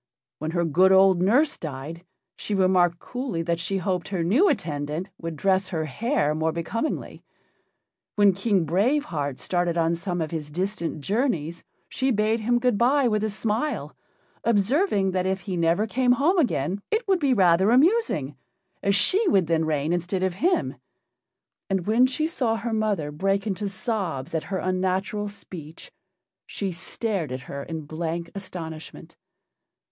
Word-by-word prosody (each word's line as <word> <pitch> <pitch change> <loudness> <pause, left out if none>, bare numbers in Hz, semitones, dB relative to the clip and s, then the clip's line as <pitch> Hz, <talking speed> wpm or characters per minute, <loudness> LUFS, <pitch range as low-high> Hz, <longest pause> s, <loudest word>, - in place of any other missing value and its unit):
When 155 - -3
her 170 - +2
good 185 +5 +4
old 190 -1 +5
nurse 250 +11 +3
died, 155 +3 -6 0.3
she 210 - -3
remarked 185 -2 +3
coolly 245 -6 -4
that 170 0 -1
she 195 +3 -1
hoped 180 -3 -2
her 185 -4 -2
new 255 - +4
attendant 155 - -2
would 165 -1 -5
dress 190 +4 +1
her 165 -5 -2
hair 155 - 0
more 160 +1 0
becomingly; 170 - -3 0.9
when 205 -2 +5
King 195 -2 +1
Brave 215 - +2
Heart 145 - -3
started 175 -1 -1
on 165 0 +2
some 175 +1 -3
of 160 0 -2
his 155 -3 -4
distant 170 -1 -3
journeys 170 - -1 0.2
she 265 0 -1
bade 220 -1 +1
him 240 +2 +1
good 240 -3 +1
bye 260 +3 +4
with 215 -2 0
a 220 - 0
smile, 220 +7 -2 0.5
observing 220 - +2
that 185 0 0
if 190 0 -1
he 185 +1 -4
never 170 +4 +2
came 245 +2 +2
home 325 +9 +2
again 195 - 0
it 440 +1 -1
would 380 -2 +3
be 275 -5 +2
rather 185 0 +4
amusing, 255 - +2 0.5
as 200 0 +2
she 390 - +3
would 195 - +4
then 160 0 +1
reign 155 +1 0
instead 180 +2 -1
of 190 -1 0
him, 360 +2 +1 0.9
and 190 -3 0
when 230 +4 +4
she 285 +4 -1
saw 250 -8 0
her 225 0 -3
mother 205 -9 0
break 195 +6 0
into 205 -1 -2
sobs 190 - -3
at 160 - -1
her 195 - -3
unnatural 185 +3 -1
speech 175 - -9 0.6
she 195 -2 -3
stared 185 - -3
at 130 0 -4
her 140 +3 -7
in 160 +2 -5
blank 165 +2 -4
astonishment. 170 -5 -8
190 Hz, 160 wpm, -25 LUFS, 165-225 Hz, 0.9 s, old